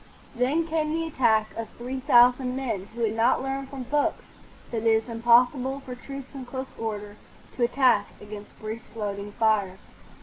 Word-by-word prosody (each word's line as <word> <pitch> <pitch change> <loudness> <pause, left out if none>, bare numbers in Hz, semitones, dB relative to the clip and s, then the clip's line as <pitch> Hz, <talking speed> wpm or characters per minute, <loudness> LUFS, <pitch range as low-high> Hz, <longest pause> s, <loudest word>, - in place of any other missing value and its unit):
Then 265 +7 +1
came 315 -1 -1
the 330 +1 -1
attack 220 -8 +2
of 230 -1 -5
three 255 +2 -4
thousand 250 0 +5
men 225 -8 -3
who 235 - -5
had 220 -2 +1
not 230 +3 +3
learned 270 0 -3
from 270 -2 -6
books 290 +4 0 0.5
that 235 - -2
it 230 - 0
is 220 0 +3
impossible 245 +4 +3
for 255 - -7
troops 275 +1 -9
in 270 -2 -6
close 260 +1 -6
order 210 -2 -4 0.4
to 245 - 0
attack 245 -4 +3
against 210 0 -10
breech 220 +1 -7
loading 205 -1 -4
fire. 210 -5 +1
245 Hz, 170 wpm, -26 LUFS, 220-265 Hz, 0.5 s, thousand